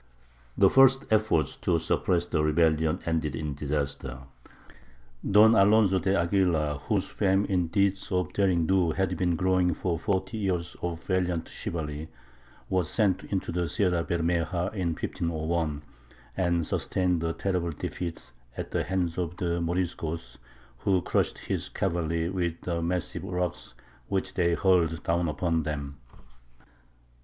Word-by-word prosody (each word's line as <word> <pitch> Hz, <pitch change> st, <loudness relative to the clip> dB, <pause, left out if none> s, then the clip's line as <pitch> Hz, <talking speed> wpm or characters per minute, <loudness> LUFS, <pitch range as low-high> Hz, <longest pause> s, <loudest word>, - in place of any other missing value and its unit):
The -, -, +6 dB
first 135 Hz, 0 st, +5 dB
effort 110 Hz, -7 st, +2 dB
to 85 Hz, -, +2 dB
suppress 85 Hz, +2 st, +1 dB
the 80 Hz, -3 st, 0 dB
rebellion 80 Hz, +1 st, +2 dB
ended 80 Hz, -2 st, -1 dB
in 75 Hz, -2 st, -3 dB
disaster. 70 Hz, -3 st, -3 dB, 1.1 s
Don 105 Hz, +3 st, +7 dB
Alonzo 100 Hz, -2 st, +5 dB
de 95 Hz, +1 st, +1 dB
Aguilar, 85 Hz, -5 st, +1 dB
whose -, -, -1 dB
fame 95 Hz, 0 st, +1 dB
in 90 Hz, -4 st, 0 dB
deeds 100 Hz, +2 st, 0 dB
of 90 Hz, -3 st, -1 dB
derring 90 Hz, -5 st, +2 dB
do 90 Hz, -3 st, +2 dB
had 95 Hz, +2 st, 0 dB
been 90 Hz, -2 st, +1 dB
growing 90 Hz, -1 st, +2 dB
for 85 Hz, -3 st, -2 dB
forty 100 Hz, +4 st, -1 dB
years 90 Hz, -4 st, -2 dB
of 85 Hz, -1 st, -4 dB
valiant 90 Hz, -3 st, -1 dB
chivalry, 75 Hz, -1 st, -5 dB, 0.6 s
was 90 Hz, -4 st, 0 dB
sent 100 Hz, -5 st, +1 dB
into 95 Hz, -3 st, -2 dB
the 85 Hz, -1 st, -1 dB
Sierra 90 Hz, -1 st, +1 dB
Bermeja 85 Hz, +1 st, -1 dB
in 90 Hz, -6 st, -1 dB
1501, 80 Hz, -3 st, -2 dB, 0.5 s
and 85 Hz, -3 st, +1 dB
sustained 90 Hz, -1 st, 0 dB
a 80 Hz, 0 st, -1 dB
terrible 90 Hz, -3 st, -1 dB
defeat 85 Hz, +2 st, -5 dB, 0.3 s
at -, -, -5 dB
the -, -, 0 dB
hands 90 Hz, -2 st, -1 dB
of 90 Hz, 0 st, -3 dB
the 85 Hz, -3 st, -1 dB
Moriscos, 85 Hz, -2 st, -3 dB, 0.4 s
who 95 Hz, -3 st, +1 dB
crushed -, -, 0 dB
his -, -, -3 dB
cavalry 85 Hz, -3 st, -1 dB
with 85 Hz, -2 st, -2 dB
the 85 Hz, -2 st, -2 dB
massive 90 Hz, 0 st, -2 dB
rocks 90 Hz, -1 st, -3 dB, 0.3 s
which 95 Hz, -1 st, -2 dB
they 85 Hz, -2 st, +2 dB
hurled 85 Hz, -4 st, +2 dB
down 85 Hz, +1 st, +1 dB
upon 80 Hz, +2 st, 0 dB
them. 70 Hz, -2 st, -4 dB
85 Hz, 140 wpm, -27 LUFS, 80-95 Hz, 1.1 s, Don